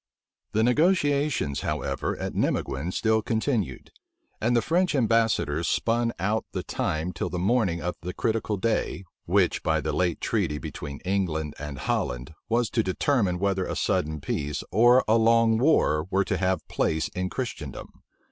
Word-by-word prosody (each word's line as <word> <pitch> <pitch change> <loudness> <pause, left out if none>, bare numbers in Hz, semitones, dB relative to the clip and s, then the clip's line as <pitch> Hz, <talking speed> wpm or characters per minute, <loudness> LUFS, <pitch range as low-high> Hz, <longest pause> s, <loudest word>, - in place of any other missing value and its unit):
The 110 - +2
negotiations, 145 - +2
however, - - -2
at - - -4
Nimeguen 75 +7 -1
still 110 +2 +2
continued; 110 - -2 0.5
and 120 +2 +2
the - - +3
French 180 0 +1
ambassadors 110 - +2
spun 115 0 +1
out 105 +5 0
the - - -3
time 80 +4 -2
till 85 +2 -3
the 90 - -4
morning 95 -4 +1
of 90 +1 -1
the 90 +2 -4
critical 110 0 -1
day, 95 -2 -1 0.2
which, - - +2
by - - +1
the - - -2
late 90 -3 0
treaty 75 - -1
between 70 -1 -7
England 85 -6 -1
and 75 -2 -6
Holland, 60 +2 -2 0.2
was 115 0 +1
to 115 - +2
determine 100 -1 +1
whether 95 0 0
a - - -3
sudden 75 -1 0
peace 70 +1 -3
or 120 +3 +6
a 110 +2 +4
long 115 0 +4
war 90 - +3
were 95 +1 +1
to 95 - -1
have 90 -3 0
place 80 0 0
in 90 0 -3
Christendom. 105 - -6
100 Hz, 155 wpm, -26 LUFS, 80-115 Hz, 0.5 s, or